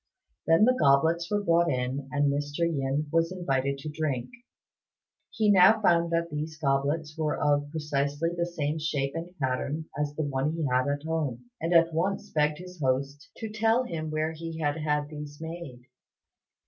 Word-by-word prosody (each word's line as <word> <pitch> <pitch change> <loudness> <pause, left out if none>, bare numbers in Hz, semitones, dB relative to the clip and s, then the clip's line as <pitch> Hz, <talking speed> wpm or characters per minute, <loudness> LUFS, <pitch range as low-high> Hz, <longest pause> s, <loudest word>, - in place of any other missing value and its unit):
Then 165 +6 +6
the 255 - +5
goblets 165 - +3
were 205 0 0
brought 170 -2 +3
in, 130 0 -2
and 145 -1 +2
Mr. 145 +3 -3
Yin 145 -3 0
was 165 +1 +2
invited 140 -7 -1
to 140 +3 -6
drink. 150 - -2 1.0
He 215 -2 +2
now 195 +3 +7
found 170 -4 +3
that 170 0 0
these 155 +1 -4
goblets 150 +2 0
were 155 -2 -1
of 145 0 +1
precisely 145 0 -1
the 170 0 -1
same 155 -2 -2
shape 145 -3 -1
and 170 +3 -6
pattern 140 +4 -2
as 145 0 -2
the 155 - -1
one 140 +1 -1
he 165 -2 -2
had 130 -1 +1
at 145 0 -1
home, 140 -7 -3
and 165 +2 -1
at 165 -1 +5
once 185 +5 -1
begged 150 -1 +1
his 180 -2 -11
host 140 +2 -1
to 220 -2 -5
tell 225 +3 +2
him 160 -8 -4
where 155 +1 -1
he 165 0 -7
had 145 -1 0
had 150 -1 -1
these 150 -1 -8
made. 160 -6 -7
155 Hz, 175 wpm, -28 LUFS, 145-170 Hz, 1.0 s, now